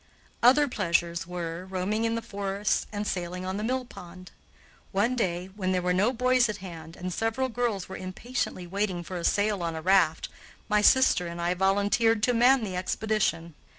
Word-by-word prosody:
Other 270 +5 +6
pleasures 170 - -1
were, 175 -1 -5
roaming 195 +4 -1
in 230 0 0
the 230 - -3
forests 200 -2 -2
and 210 0 -3
sailing 180 -1 -3
on 190 +1 -3
the 210 - -3
mill 255 +2 -1
pond. 185 -4 -12 0.6
One 215 +6 +1
day, 185 -4 -2
when 185 -2 -1
there 180 - +1
were 180 0 +1
no 200 +6 +2
boys 255 -1 +2
at 210 - -3
hand 165 -4 -9
and 180 0 -5
several 225 +6 -1
girls 230 -5 -2
were 190 - -7
impatiently 185 0 -4
waiting 190 -1 -2
for 180 +1 -6
a 170 - -5
sail 205 0 +1
on 165 -1 -2
a 160 - -5
raft, 180 -4 +3 0.4
my 210 -1 +2
sister 210 -6 +4
and 170 0 -7
I 170 +1 +1
volunteered 205 +4 +2
to 245 - +3
man 245 +2 +4
the 190 -4 -4
expedition. 185 -3 -1
195 Hz, 185 wpm, -27 LUFS, 180-225 Hz, 0.6 s, Other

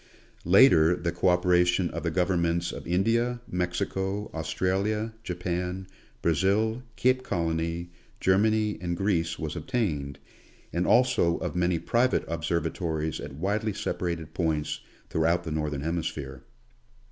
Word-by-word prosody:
Later, 90 -4 +6
the 85 -1 -2
co 85 +2 0
operation 90 0 +3
of - - -4
the 85 - -1
Governments 85 -1 +1
of - - -8
India, 115 +7 +1
Mexico, 95 +3 -2
Australia, 100 +7 -1
Japan, 90 0 -3 0.4
Brazil, 100 +8 +2
Cape 130 +1 +2
Colony, 85 -3 -2 0.3
Germany, 105 +1 +2
and 85 -1 -2
Greece, 85 -4 0
was 80 -2 -4
obtained, 80 - -2 0.6
and 85 +1 0
also 120 -9 +4
of - - -4
many 90 -1 +2
private 120 +9 +1
observatories 80 -1 -2
at 70 -1 -7
widely 105 +6 -1
separated 85 -5 -3
points 80 -4 -1 0.3
throughout 85 +2 +2
the 80 - -5
Northern 75 -2 -2
Hemisphere. 75 -5 -3
90 Hz, 120 wpm, -27 LUFS, 80-100 Hz, 0.6 s, Later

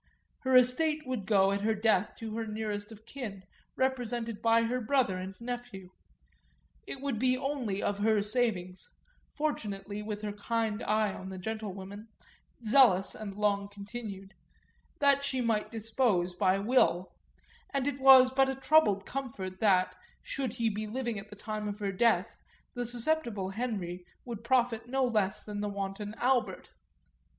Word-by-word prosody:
Her 260 0 +1
estate 300 +5 +4
would 250 -7 -4
go 195 -2 +4
at 200 0 -1
her 220 +1 +1
death 210 -2 +1
to 220 -1 -6
her 225 -1 -3
nearest 210 -1 -4
of 220 0 -13
kin, 215 -8 -7 0.3
represented 240 -4 -1
by 230 0 +4
her 250 +2 -1
brother 245 -4 +2
and 190 +1 -6
nephew; 240 -6 -6 1.0
it 270 - -6
would 275 -6 -2
be 255 +1 +2
only 255 -7 -2
of 205 0 -1
her 215 -1 +3
savings 205 -5 0 0.5
fortunately, 210 -9 -3
with 210 0 -5
her 210 - -2
kind 220 +1 -2
eye 215 -3 +1
on 190 - -8
the 190 - -7
gentlewomen, 205 0 -6 0.6
zealous 215 -5 +5
and 205 -3 -7
long 200 -1 +1
continued 200 -1 -8 0.6
that 280 -1 +4
she 265 -2 0
might 225 -3 0
dispose 220 -5 +1
by 185 +1 +2
will; 200 -4 +2 0.6
and 275 -2 -1
it 280 -1 -2
was 260 -1 +8
but 270 0 +3
a 265 - -1
troubled 265 -8 +3
comfort 205 -9 -5
that, 185 -4 +3 0.3
should 260 -5 -3
he 235 -2 0
be 215 0 -2
living 235 -1 -3
at 205 +1 -11
the 210 - -10
time 215 0 -4
of 205 0 -4
her 200 -2 -2
death, 230 +5 +2 0.4
the 245 -1 -3
susceptible 235 -6 -1
Henry 195 -6 -4 0.2
would 230 -3 -6
profit 240 -2 +1
no 265 +1 +1
less 210 -5 +1
than 205 -1 -5
the 210 - -1
wanton 200 +1 -5
Albert. 250 0 0
220 Hz, 160 wpm, -30 LUFS, 200-250 Hz, 1.0 s, was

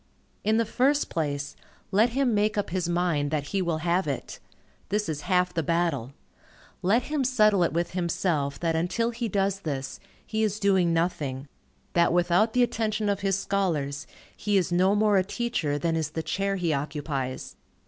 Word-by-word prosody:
In 215 +2 +2
the 230 - +2
first 275 +6 +1
place, 145 -3 -2 0.4
let 215 +5 +4
him 255 0 +1
make 210 0 +1
up 205 - -1
his 180 -1 -1
mind 170 -5 +1
that 145 -1 -2
he 195 - 0
will 170 -3 0
have 175 0 +1
it. 140 -3 -4 0.5
This 210 +1 0
is 150 -2 -3
half 180 -1 +2
the 165 - 0
battle. 160 -6 0 0.7
Let 220 +7 +3
him 295 0 -1
settle 215 -6 +3
it 170 - +2
with 170 +3 -1
himself, 170 -5 -1
that 165 -1 +1
until 180 +8 0
he 235 0 -3
does 195 -1 0
this, 140 -6 -4 0.3
he 220 0 -2
is 215 -1 0
doing 190 -4 +3
nothing; 150 -5 -1 0.5
that 170 -1 +4
without 175 +5 +3
the 250 - +4
attention 220 -3 -1
of 200 -1 0
his 195 -1 +1
scholars, 160 -9 -1 0.3
he 205 -1 +1
is 180 -2 0
no 185 +3 +3
more 210 -1 +3
a - - +2
teacher, 190 -9 -2
than 165 +2 0
is 160 -2 -1
the 160 +1 -4
chair 195 +3 -1
he 175 -4 0
occupies. 140 -2 -3
180 Hz, 180 wpm, -26 LUFS, 160-210 Hz, 0.7 s, let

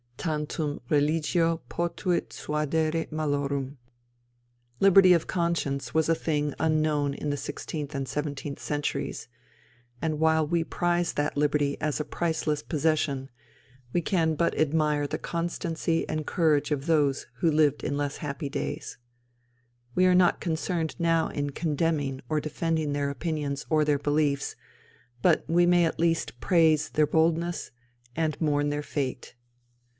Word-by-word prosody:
Tantum 150 -1 -2
religio 160 +3 +2
potuit 175 +1 -1
suadere 155 +2 -1
malorum. 140 -2 -2 1.0
Liberty 195 -1 +7
of 170 -2 +2
conscience 145 -8 -1
was 160 0 +2
a 165 - +4
thing 150 -3 -1
unknown 155 -3 +1
in 150 - -4
the 145 - -2
sixteenth 145 +1 -5
and 135 -1 -2
seventeenth 145 -1 -4
centuries; 145 -5 -3 0.7
and 155 -2 -1
while 160 0 +3
we 165 +2 +1
prize 175 +1 0
that 145 0 -1
liberty 145 -1 +1
as 150 -1 -1
a 150 - -2
priceless 160 -1 -1
possession, 150 -4 0 0.6
we 175 - +2
can 160 -3 +1
but 170 +2 0
admire 150 -1 +2
the - - -3
constancy 170 -1 -2
and 155 -1 -3
courage 155 -5 +2
of 145 -2 -1
those 145 -4 +2
who 170 - +2
lived 150 -2 +2
in 140 - -1
less 145 -1 -2
happy 145 0 -4
days. - - -4 1.0
We 185 - +4
are 180 0 +5
not 180 -1 +4
concerned 165 -1 -2
now 165 -1 +2
in 145 0 -3
condemning 145 -3 -1
or 155 - +1
defending 155 0 -1
their 145 0 0
opinions 145 -1 -3
or 155 -1 +3
their 145 -1 +2
beliefs, 145 -1 0 0.7
but 170 -3 +4
we 175 +2 +4
may 175 -1 +4
at 160 - -2
least 165 -6 0
praise 160 -3 +3
their 150 -1 +2
boldness 165 +2 +1 0.4
and 155 -2 -1
mourn 145 -2 +1
their 145 0 -2
fate. 130 -5 -4
155 Hz, 140 wpm, -27 LUFS, 145-165 Hz, 1.0 s, Liberty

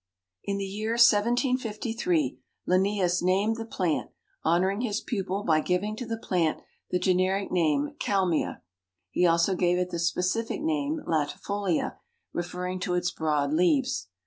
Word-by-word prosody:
In 200 0 -2
the 200 - -2
year 215 +3 -3
1753 230 - +2 0.3
Linnaeus 185 -1 +2
named 195 +5 +2
the 225 - -5
plant, 180 -7 -1 0.3
honoring 185 +6 +2
his 215 -4 -1
pupil 195 -3 -3
by 155 -4 +3
giving 190 +5 -1
to 245 - -5
the 225 0 -2
plant 175 -7 0 0.3
the 180 - +1
generic 185 +2 +1
name 150 -5 +1
Kalmia. 185 -5 0 0.5
He 180 - +3
also 170 +3 +3
gave 180 -1 +2
it 180 0 -1
the 170 - -3
specific 180 +6 0
name 310 -1 -1
latifolia, 170 +4 -1 0.4
referring 180 +1 -3
to 180 -1 -1
its 180 0 0
broad 150 -3 0
leaves. 180 - +2
185 Hz, 140 wpm, -27 LUFS, 175-215 Hz, 0.5 s, by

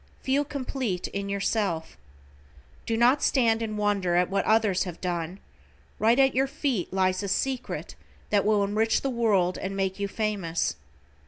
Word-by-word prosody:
Feel 275 +2 +2
complete 255 -9 -3
in 200 0 -4
yourself. 200 -4 -1 0.9
Do 225 - 0
not 245 +5 +4
stand 230 -4 +2
in 215 -2 -3
wonder 200 -4 +1
at 180 +1 +2
what 195 0 +1
others 215 -4 +2
have 175 -3 -7
done, 175 0 -3 0.6
right 225 +3 +4
at 270 -1 +4
your 265 +2 +2
feet 270 - -2
lies 185 0 +1
a 200 - -3
secret 255 +6 -2 0.4
that 205 -1 +3
will 210 -1 +3
enrich 215 +3 +1
the 270 - -1
world 205 -7 +1
and 195 +1 -4
make 190 0 -1
you 200 - -1
famous. 195 - -1
205 Hz, 160 wpm, -26 LUFS, 190-235 Hz, 0.9 s, not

